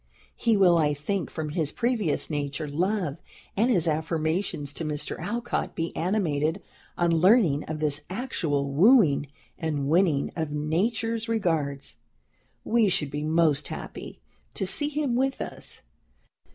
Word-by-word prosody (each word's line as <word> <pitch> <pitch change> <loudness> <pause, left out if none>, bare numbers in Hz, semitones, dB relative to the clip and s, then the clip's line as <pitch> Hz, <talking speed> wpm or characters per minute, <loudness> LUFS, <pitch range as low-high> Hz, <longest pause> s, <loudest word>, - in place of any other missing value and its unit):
He 230 -3 +2
will, 180 -3 +5
I 150 -2 +2
think, 175 +5 -2
from 155 -2 -4
his 155 -1 -1
previous 230 - 0
nature 145 0 -3
love, 170 0 -1 0.3
and 225 +5 +2
his 175 -9 +3
affirmations 160 -1 -1
to 165 - -4
Mr. 150 -1 -3
Alcott, 235 +7 -3
be 165 0 -3
animated 165 -2 0 0.3
on 170 -1 +2
learning 170 - +4
of 155 0 -5
this 150 -1 0
actual 160 - -2
wooing 165 - +5 0.3
and 150 -4 -2
winning 160 -4 +2
of 160 -3 -2
Nature's 220 +10 -1
regards. 150 - -1 0.7
We 225 -2 +3
should 165 -7 -1
be 145 0 -3
most 155 -2 +2
happy - - -8 0.4
to - - -1
see 290 -1 +2
him 295 -4 -1
with 265 +2 0
us. - - -5
165 Hz, 140 wpm, -26 LUFS, 150-205 Hz, 0.7 s, will